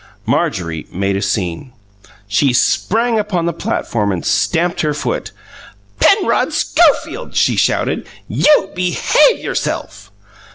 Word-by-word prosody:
Marjorie 80 -3 -2
made 100 +2 -1
a 100 - -2
scene. 100 +3 -3 0.5
She 115 +6 +2
sprang 225 - +1
upon 195 -5 -1
the 170 - -1
platform 120 - -2
and 90 -3 -4
stamped 175 +1 0
her 150 -2 -1
foot. - - -3 0.7
"Penrod 395 -1 +3
Schofield!" - - +1
she - - +2
shouted. - - 0 0.2
"You 295 -10 +3
BEHAVE 180 - +2
yourself!" - - -4
150 Hz, 115 wpm, -16 LUFS, -, 0.7 s, Penrod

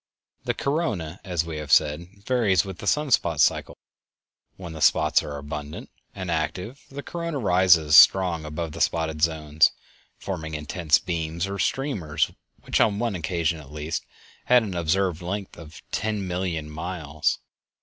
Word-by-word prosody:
The - - 0
corona, 105 - -2
as 85 -4 -1
we 80 -2 -5
have 75 -1 -6
said, 75 +4 +3 0.2
varies 110 -7 +2
with 95 -3 -8
the 100 - -6
sun 150 +2 +1
spot - - +2
cycle. - - +2 0.8
When 85 -3 -8
the 80 - -8
spots - - +4
are 75 - -6
abundant 75 +1 -7 0.2
and 95 -3 -4
active 90 - -3
the 140 +1 -7
corona 170 0 -4
rises 90 - +4
strong 90 -4 +6
above 75 +1 -4
the 85 +2 -7
spotted 80 -2 0
zones, 80 -1 +3 0.5
forming 80 -5 -5
immense 75 +1 +1
beams 85 -2 -3
or 100 0 -5
streamers, 90 - -1 0.3
which - - +1
on 100 -2 +3
one 115 -1 -1
occasion, 85 -2 -1
at 70 -2 -13
least, 75 +1 -4 0.4
had 125 -1 +5
an 100 -4 -4
observed 90 +1 0
length 95 +3 -5
of 80 -2 -12
_ten 105 -1 -1
million 90 -4 -3
miles. 75 -2 -2
85 Hz, 155 wpm, -25 LUFS, 80-100 Hz, 0.8 s, strong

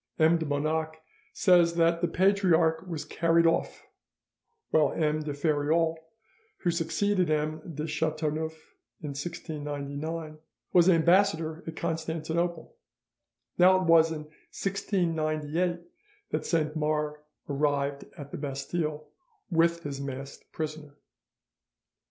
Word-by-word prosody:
M. 160 +1 +4
de 160 - -3
Bonac 155 +2 -1 0.4
says 175 -4 +4
that 170 0 +3
the 175 - +2
Patriarch 175 -3 +2
was 165 -4 -4
carried 170 0 +2
off, 165 0 0 0.9
while 150 -3 +3
M. 155 -1 +1
de 150 -1 -4
Feriol, 155 +2 +1 0.7
who 175 - +2
succeeded 170 +2 0
M. 155 +1 0
de 155 +1 -3
Chateauneuf 155 0 -3 0.3
in 150 - -5
1699, 150 +1 -5 0.3
was 175 0 +6
ambassador 165 -2 +3
at 165 - -5
Constantinople. 160 - -2 0.8
Now 185 +1 +7
it - - -1
was 165 -1 +5
in 155 -1 -4 0.3
1698 170 -3 -1 0.5
that - - -2
Saint 155 -2 0
Mars 150 -1 -1 0.3
arrived 140 -1 0
at 145 -1 -9
the - - -5
Bastille 150 +2 -3 0.4
with 170 0 +2
his 140 -1 -5
masked 135 0 -7
prisoner. 155 -2 -6
160 Hz, 110 wpm, -28 LUFS, 150-170 Hz, 0.9 s, Now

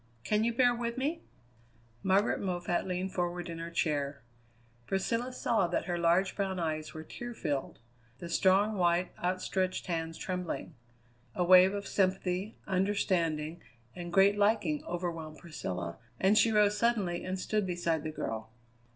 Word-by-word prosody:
Can 210 - +1
you 235 - +2
bear 245 +1 +4
with 235 0 -3
me?" 300 +6 -1 0.8
Margaret 195 +5 +2
Moffatt 175 -1 -1
leaned 185 +1 -2
forward 175 -1 -2
in 165 - -6
her 165 0 -5
chair. 145 -4 -1 0.6
Priscilla 230 +6 -1
saw 225 -6 +1
that 175 - -1
her 175 - -1
large 175 +3 +3
brown 190 -2 -1
eyes 155 -2 -3
were 155 - -6
tear 240 +7 -7
filled; 145 -8 -3 0.4
the 170 - -7
strong, 195 +4 +3
white, 175 0 +2
outstretched 185 +1 -1
hands 165 -2 -3
trembling. 180 -2 -4 0.6
A 180 - +1
wave 185 +2 +7
of 200 0 -4
sympathy, 185 +1 0
understanding, 175 -5 0 0.3
and 175 -1 -6
great 195 +3 +5
liking 200 -8 +2
overwhelmed 165 -3 -4
Priscilla, 90 - -5 0.2
and 195 +3 +4
she 225 +1 +5
rose 210 -1 +4
suddenly 205 -7 +1
and 185 0 -3
stood 210 +1 0
beside 170 -3 0
the 155 - -4
girl. 110 -7 -4
180 Hz, 150 wpm, -31 LUFS, 170-200 Hz, 0.8 s, wave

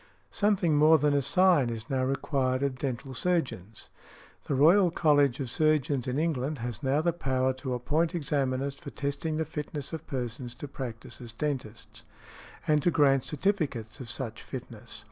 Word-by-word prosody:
Something 195 -7 +2
more 155 +2 +7
than 145 0 +2
a 140 - +3
sign 175 -4 +3
is 115 -2 -6
now 130 -1 0
required 130 0 0
of 135 -2 -1
dental 130 0 -4
surgeons. 125 - -2 0.6
The 140 - 0
Royal 175 +7 +6
College 145 -5 +3
of 130 -4 -3
Surgeons 145 -3 +1
in 125 +2 -1
England 150 -2 -1
has 120 0 -5
now 140 +2 +1
the 170 +1 +1
power 130 -5 0
to 130 -3 -2
appoint 155 +8 0
examiners 140 -3 -1
for 140 - -10
testing 145 +4 -3
the 160 - 0
fitness 150 -1 -6
of 160 - -6
persons 120 -1 -4
to 145 - -7
practise 120 -4 -7
as 120 -2 -8
dentists, 125 -5 -5 0.6
and 150 -1 +3
to 175 - +3
grant 140 -5 +3
certificates 150 - -1
of 125 -3 -8
such 115 -3 -5
fitness. 115 -3 -8
140 Hz, 165 wpm, -28 LUFS, 125-155 Hz, 0.6 s, more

